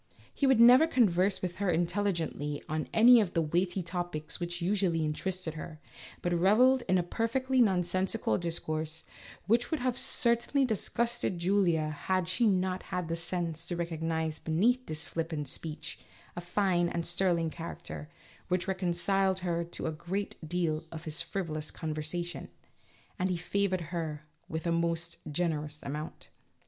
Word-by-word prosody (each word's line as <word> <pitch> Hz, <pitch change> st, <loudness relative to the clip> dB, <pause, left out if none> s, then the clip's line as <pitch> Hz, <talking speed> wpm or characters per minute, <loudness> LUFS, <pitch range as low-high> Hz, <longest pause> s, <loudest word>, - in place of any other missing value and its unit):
He 280 Hz, -, +1 dB
never 250 Hz, +3 st, +8 dB
would 325 Hz, -, -8 dB
converse 195 Hz, -5 st, +3 dB
with 180 Hz, 0 st, -3 dB
her 200 Hz, -2 st, 0 dB
intelligently 170 Hz, -4 st, -1 dB
on 155 Hz, 0 st, -2 dB
any 235 Hz, +1 st, +8 dB
of 185 Hz, -4 st, -3 dB
the 165 Hz, -, +3 dB
weighty 175 Hz, +4 st, 0 dB
topics 170 Hz, -3 st, -3 dB
which 175 Hz, 0 st, -3 dB
usually 175 Hz, -3 st, +1 dB
inter 150 Hz, +5 st, -2 dB
ested 185 Hz, -4 st, -4 dB
her, 155 Hz, 0 st, -8 dB, 0.4 s
but 175 Hz, -, +1 dB
revelled 225 Hz, +9 st, +5 dB
in 185 Hz, -, +5 dB
a 180 Hz, -, +2 dB
perfectly 255 Hz, +7 st, +1 dB
nonsensical 185 Hz, 0 st, +1 dB
discourse, 160 Hz, -2 st, -2 dB, 0.4 s
which 235 Hz, +3 st, +2 dB
would 315 Hz, -, -1 dB
have 250 Hz, -1 st, 0 dB
certainly 235 Hz, +4 st, +2 dB
disgusted 235 Hz, -2 st, 0 dB
Julia 170 Hz, -4 st, +2 dB
had 180 Hz, +4 st, -1 dB
she 225 Hz, +6 st, +2 dB
not 185 Hz, -2 st, +1 dB
had 180 Hz, -2 st, -2 dB
the 165 Hz, -, 0 dB
sense 170 Hz, -1 st, -2 dB
to 175 Hz, -, -1 dB
recognize 160 Hz, -2 st, -2 dB
beneath 235 Hz, +11 st, +1 dB
this 155 Hz, 0 st, -2 dB
flippant 160 Hz, -3 st, -3 dB
speech, 155 Hz, +3 st, -6 dB, 0.4 s
a 175 Hz, -, -4 dB
fine 175 Hz, -1 st, +1 dB
and 170 Hz, -1 st, -2 dB
sterling 175 Hz, -2 st, +1 dB
character, 165 Hz, -2 st, -7 dB, 0.4 s
which 180 Hz, 0 st, 0 dB
reconciled 190 Hz, +1 st, +1 dB
her 170 Hz, -1 st, 0 dB
to 170 Hz, -, -5 dB
a 160 Hz, -, 0 dB
great 185 Hz, +6 st, -4 dB
deal 165 Hz, -3 st, 0 dB
of 160 Hz, -1 st, -7 dB
his 155 Hz, +1 st, -2 dB
frivolous 165 Hz, -3 st, -4 dB
con 160 Hz, -2 st, -4 dB
versation 170 Hz, +3 st, -4 dB, 0.7 s
(and 185 Hz, +1 st, +1 dB
he 180 Hz, -, 0 dB
favored 185 Hz, +1 st, 0 dB
her 155 Hz, -3 st, -3 dB, 0.2 s
with 160 Hz, +1 st, -4 dB
a 170 Hz, -, +1 dB
most 170 Hz, 0 st, -1 dB
generous 150 Hz, -2 st, -2 dB
amount). 150 Hz, +2 st, -6 dB
175 Hz, 155 wpm, -30 LUFS, 160-195 Hz, 0.7 s, never